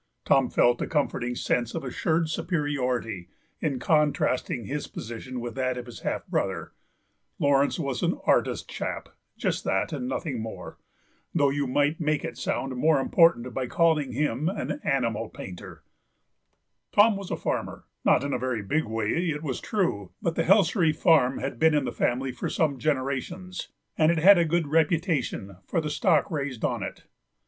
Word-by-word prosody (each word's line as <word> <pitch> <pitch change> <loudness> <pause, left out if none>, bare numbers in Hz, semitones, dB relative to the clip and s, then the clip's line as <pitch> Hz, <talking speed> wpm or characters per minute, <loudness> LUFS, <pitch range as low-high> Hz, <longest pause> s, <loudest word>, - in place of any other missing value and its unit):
Tom 135 -2 +4
felt 120 0 +3
a - - -1
comforting 125 -5 -1
sense 120 -1 -1
of 165 - -3
assured 160 +5 0
superiority 130 - -2 0.3
in 145 -5 -1
contrasting 135 -4 +1
his 145 +5 -4
position 120 +2 -7
with 120 -1 -5
that 130 0 -1
of 125 - -5
his 120 - -10
half - - -3
brother; - - -2 0.7
Laurence 140 0 +2
was 140 -6 -2
an - - +1
artist - - +2
chap, - - -5 0.3
just - - -1
that 95 +11 0
and 130 -4 -3
nothing 130 -2 -3
more, 110 0 -8 0.6
though 145 -4 +3
you 140 0 -1
might 145 +4 +1
make 155 -1 0
it 165 - -5
sound 135 -1 -2
more 150 +3 +3
important 135 -4 +3
by 130 0 -2
calling 155 -3 +2
him 145 +3 0
an 205 +8 -3
animal 115 -5 0
painter; 90 -4 -10 1.1
Tom 210 +1 +5
was 195 -2 -6
a - - -2
farmer, - - -3 0.2
not - - +4
in 140 - -2
a - - 0
very 125 -4 -2
big 155 +10 0
way, 115 +11 -1
it 150 0 -3
was 135 -5 -3
true, 170 - -1
but 170 - -1
the 165 - 0
Helsery 195 -3 +4
farm 150 -5 +3
had 120 - -4
been 160 -1 +4
in 145 -3 +1
the - - -2
family 130 +2 0
for 125 - -4
some 140 -5 0
generations, 155 +6 -2 0.3
and 155 +1 +5
it 170 - 0
had 185 +3 +7
a 170 - +3
good 165 +1 +1
reputation 155 - 0
for - - 0
the 150 -2 -2
stock 150 0 +2
raised 140 -6 -2
on - - -1
it. - - -6
140 Hz, 175 wpm, -26 LUFS, 125-160 Hz, 1.1 s, had